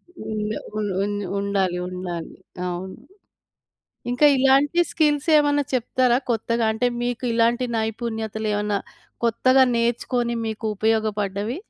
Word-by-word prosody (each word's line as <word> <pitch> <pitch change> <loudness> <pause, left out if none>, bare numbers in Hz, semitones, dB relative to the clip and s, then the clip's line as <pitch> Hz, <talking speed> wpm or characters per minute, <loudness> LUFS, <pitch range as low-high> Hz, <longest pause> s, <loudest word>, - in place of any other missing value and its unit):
హ్మ్. 215 -4 -4 0.2
ఉన్ 210 -1 -1
ఉన్ 205 0 -2 0.2
ఉండాలి 195 -3 0
ఉండాలి. 180 -2 -6 0.3
అవును. 180 +2 -5 1.2
ఇంకా 250 +4 +3
ఇలాంటి 275 +5 +4
స్కిల్సేమన్నా 295 -1 +3
చెప్తారా? 250 0 +2
కొత్తగా 230 +1 0
అంటే 230 +3 0
మీకు 245 +1 -2
ఇలాంటి 235 +2 +2
నైపుణ్యతలేవన్నా 220 -2 -2 0.5
కొత్తగా 255 +3 +4
నేర్చుకొని 235 +1 0
మీకు 220 0 -4
ఉపయోగపడ్డవి? 215 - -1
225 Hz, 100 wpm, -23 LUFS, 210-250 Hz, 1.2 s, ఇలాంటి